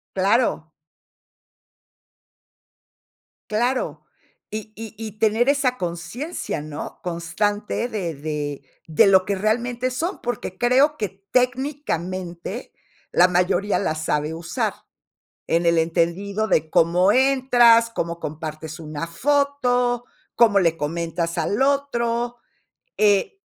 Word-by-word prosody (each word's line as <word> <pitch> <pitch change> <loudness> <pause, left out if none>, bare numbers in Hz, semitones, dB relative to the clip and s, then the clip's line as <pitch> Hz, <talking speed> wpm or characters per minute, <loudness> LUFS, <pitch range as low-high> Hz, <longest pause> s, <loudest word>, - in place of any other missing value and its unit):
Claro. 195 -4 +1 2.8
Claro. 245 +4 -1 0.5
Y 215 0 -6
y 225 0 -8
y 215 -1 -8
tener 225 +3 +2
esa 275 -3 +1
consciencia, 175 - -4
¿no? 150 -1 -7
Constante 205 +7 -2
de 190 -8 -3
de 145 -1 -4 0.2
de 160 +3 +4
lo 190 -1 +5
que 200 - 0
realmente 235 +5 -1
son, 330 +10 -3
porque 240 -6 -4
creo 265 +5 +3
que 210 -6 -2 0.2
técnicamente 240 - -2 0.4
la 180 - +6
mayoría 180 +3 +1
la 155 - -1
sabe 155 0 -1
usar. 165 0 -2 0.7
En 170 +1 +2
el 170 0 +4
entendido 175 +6 0
de 160 -5 +2
cómo 175 +5 +4
entras, 245 -3 +5
cómo 170 -6 -3
compartes 155 +1 -6
una 155 0 -5
foto, 250 +2 +1 0.3
cómo 220 -4 +5
le 165 -4 +2
comentas 170 +2 -2
al 200 +9 0
otro. 240 -4 0 0.6
Eh 205 - +2
205 Hz, 105 wpm, -22 LUFS, 170-245 Hz, 2.8 s, la